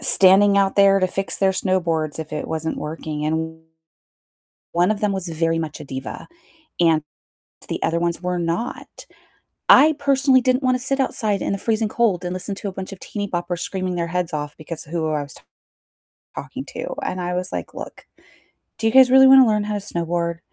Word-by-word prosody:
standing 200 +1 +5
out 195 -1 +2
there 195 -1 +5
to 185 - +2
fix 195 +1 -2
their 195 -1 +2
snowboards 170 -5 -1
if 160 -1 -7
it 150 - -4
wasn't 160 0 -2
working, 150 -1 -5
and 160 +1 -3 1.1
one 175 +3 +2
of 210 -1 -1
them 210 -1 +1
was 190 -2 -2
very 165 0 0
much 160 -1 -5
a - - -8
diva, 135 -1 -7 0.5
and 165 -3 +3 0.7
the - - -3
other 165 - +1
ones 170 0 -1
were 180 0 -2
not. 170 +8 -4 0.6
I 310 +3 +7
personally 275 -2 +3
didn't 255 +2 +1
wanna 255 0 +2
sit 270 +2 -1
outside 215 -6 -1
in - - -1
the 200 - -2
freezing 220 +1 0
cold 210 -6 0
and 180 - -3
listen 185 +2 -4
to 200 - -5
a - - -5
bunch 190 0 -7
of 195 - -9
teenyboppers 180 -4 -4
screaming 185 -1 -3
their 170 -1 -2
heads 180 0 -2
off 150 -1 -4
because 155 0 -7
of 155 - -14
who 165 -2 -1
I 150 -1 -1
was 140 -2 -10 1.0
talking - - -6
to, - - -5
and 185 - -3
I 180 0 -3
was 180 +1 -3
like, - - -5
"Look, - - -9 0.7
do 225 - 0
you - - +2
guys 260 -1 +7
really 265 0 +8
wanna 265 -1 +8
learn 210 -1 +1
how 210 0 -3
to - - -2
snowboard?" 170 -3 -3
185 Hz, 200 wpm, -21 LUFS, 165-210 Hz, 1.1 s, really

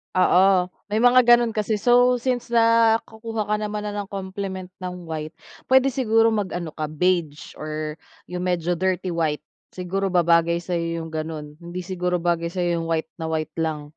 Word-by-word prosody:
Oo 185 0 +4 0.2
may 215 +3 0
mga 250 +1 +7 0.2
ganun 240 -1 0
kasi, 215 0 -1
so 245 +3 +4
since 245 0 -2
nakukuha 230 -1 +2
ka 210 +1 0
naman 210 0 -3
ng 205 -1 -4
compliment 190 -1 -6
ng 180 -1 -6
white, 155 -1 -6 0.3
puwede 265 +1 +4
siguro 225 -3 +3
mag-ano 180 -6 -3
ka 155 0 -4
beige 155 -1 -1
or 155 0 -5 0.2
yung 180 0 -6
medyo 175 -1 0
dirty 185 +1 -1
white, 160 -3 -1 0.3
siguro 190 +2 -2
babagay 170 -1 +2
sa'yo 170 -2 -2
yung 160 - -9
ganun. 155 -1 -6
Hindi 175 +1 -7
siguro 180 -1 -2
bagay 170 -1 +1
sa'yo 175 -1 -1
yung 165 - -4
white 160 -1 -2
na 160 - -3
white 155 -1 -2
lang. 155 -2 -1
180 Hz, 165 wpm, -23 LUFS, 165-210 Hz, 0.3 s, mga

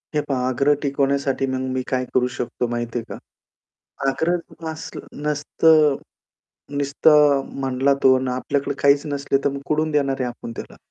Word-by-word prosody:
हे 150 - +3
पहा 130 -2 0
आग्रह 140 +4 +3
टिकवण्यासाठी, 140 -1 0
मग 130 0 -2
मी 130 - -1
काय 130 -1 -1
करू 125 -1 +3
शकतो 125 0 -3
माहिती 120 0 -3
आहे - - -7
का? - - -6 0.9
आग्रह 170 +5 0 0.3
नसलं 160 0 -8 0.2
नसतं 150 0 +3 0.8
निसतं 145 0 +4 0.2
म्हणला 135 +1 +2
तो 130 0 +7
आणि 130 -1 -2
आपल्याकडे 135 +2 -2
काहीच 140 +2 +4
नसले, 140 -1 0
तर - - +4
मग 140 0 -5
कुठून 155 +1 0
देणार 140 -3 0
आहे 125 - 0
आपण 120 -1 -8
त्याला? - - -8
140 Hz, 160 wpm, -22 LUFS, 130-145 Hz, 0.9 s, तो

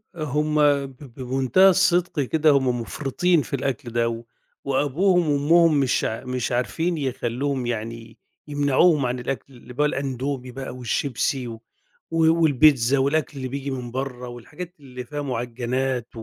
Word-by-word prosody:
هُم 150 0 -1 0.3
ب 135 -1 -11 0.2
بمنتهى 130 - +4
الصدق 180 -3 +2
كده 155 +4 +2
هُم 130 -3 +1
مُفرطين 150 +7 0
في 140 - -4
الأكل 135 -1 -3
ده، 115 0 -1 0.4
وأبوهم 155 +6 +2
وأمهم 155 +2 +4
مش 135 -2 +1
ع 115 +3 -3
مش 125 -1 -3
عارفين 160 +8 -1
يخلوهم 130 0 -2
يعني 115 -1 -5 0.3
يمنعوهم 145 +1 +3
عن 125 0 -2
الأكل 130 +1 -5
اللي 125 0 -13
بال 150 +3 +1
الأندومي 135 -2 -3
بَقى 130 0 -7
والشيبسي 125 +1 -1
و 115 -1 -8 0.5
والبيتزا 155 -5 +4
والأكل 140 +2 0
اللي 130 -1 -4
بييجي 140 +1 -4
من 125 -2 -5
بَرّه 125 -1 -4
والحاجات 165 +9 -9
اللي 125 -2 -9
فيها 145 +4 -5
معجنات، 125 0 -2
135 Hz, 135 wpm, -23 LUFS, 125-150 Hz, 0.5 s, بمنتهى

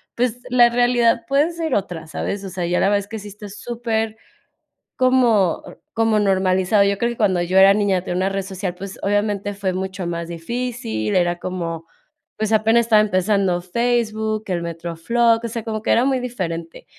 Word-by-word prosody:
pues, 245 0 0
la 240 -1 +6
realidad 240 -1 +2
puede 285 +5 +2
ser 330 -4 -3
otra, 175 -5 -3
¿sabes?, 200 +5 -4
o 195 - -6
sea, 180 -1 -3
ya 175 +1 +1
la - - +3
verdad, 205 0 +3
es 200 - -8
que 220 - -6
sí 205 0 -9
está 205 0 -10
super 225 0 -3 0.8
como, 240 -8 +3
n - - -11 0.2
como 225 -1 +2
normalizado. 190 0 +2
Yo 200 0 +1
creo 235 - 0
que 235 - -6
cuando 190 -5 +2
yo 180 +2 -1
era 195 +1 +8
niña, 200 -3 +1
tener 175 - -4
una 185 +1 +1
red 195 0 -2
social, 190 -1 -5
pues 195 +1 -8
obviamente 205 0 0
fue 195 -2 -2
mucho 190 0 -4
más 170 -1 -4
difícil, 170 - -3
era 175 -1 +1
como, 165 -3 -5 0.5
pues, 215 0 -1
apenas 225 +2 +3
estaba 220 -2 +5
empezando 195 -2 +1
Facebook, 220 +1 -1
el 180 -3 -1
MetroFlog, 170 +8 0
o - - -2
sea, 230 0 -5
como 220 -1 -4
que - - 0
era 240 - +4
muy 265 -1 +1
diferente. 170 -10 -5
205 Hz, 190 wpm, -21 LUFS, 185-230 Hz, 0.8 s, era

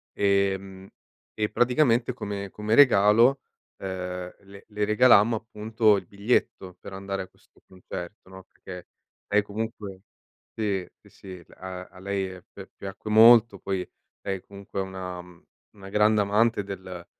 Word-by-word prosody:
ehm, 100 -1 0 0.5
e 105 -1 -2
praticamente 125 -1 +2
come 100 -4 -6
come 105 +1 -1
regalo, 120 +1 +5 0.4
uhm, 95 - -4 0.5
le 100 0 -15
le 105 -1 -2
regalammo 115 0 +5
appunto 110 0 +1
il 95 - -6
biglietto 100 -3 -1
per 100 - -10
andare 95 0 -4
a - - -13
questo - - -29
concerto, 95 +1 -9
no, 95 0 -12
perché 90 -2 -12 0.5
lei 105 - +5
comunque 105 -2 -6 0.6
sì, 100 -4 -1 0.2
sì, - - -20
sì, 90 -3 -12
a 90 0 -8
a - - -17
lei 95 -1 -3
pi 95 -1 -11
piacque 100 +2 -8
molto. 110 -2 +7
Poi 95 -2 -4 0.3
lei 95 -2 -4
comunque 100 0 -7
è - - -1
una 95 -1 -7 0.6
una 95 -1 -11
grande 105 +1 +3
amante 105 +2 +1
del 95 -3 -8
100 Hz, 140 wpm, -26 LUFS, 95-110 Hz, 0.6 s, molto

